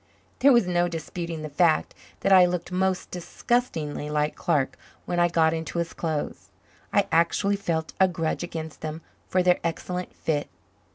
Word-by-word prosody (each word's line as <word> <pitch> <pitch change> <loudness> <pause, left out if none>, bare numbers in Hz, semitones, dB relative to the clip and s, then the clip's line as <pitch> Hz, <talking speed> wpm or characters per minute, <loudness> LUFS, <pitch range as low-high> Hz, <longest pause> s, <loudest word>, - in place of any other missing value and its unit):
There 280 - +6
was 235 -5 +5
no 175 -1 +2
disputing 165 -1 -5
the - - -3
fact 155 +2 +2 0.3
that 195 - +4
I 185 -1 +8
looked 175 0 -3
most 185 0 0
disgustingly 170 -5 -2
like 150 0 0
Clark 135 -3 0 0.3
when 175 - -1
I 175 - +5
got 165 -2 +3
into 165 +1 -4
his 170 -1 -2
clothes. 155 -3 -3 0.4
I - - +3
actually 170 +5 +3
felt 165 -5 -2
a 190 - +6
grudge 165 -3 -2
against 160 -4 -6
them 155 +1 -5 0.2
for 185 -1 +2
their 180 -1 +4
excellent 180 +2 -3
fit. 150 -2 -1
170 Hz, 165 wpm, -26 LUFS, 160-180 Hz, 0.4 s, I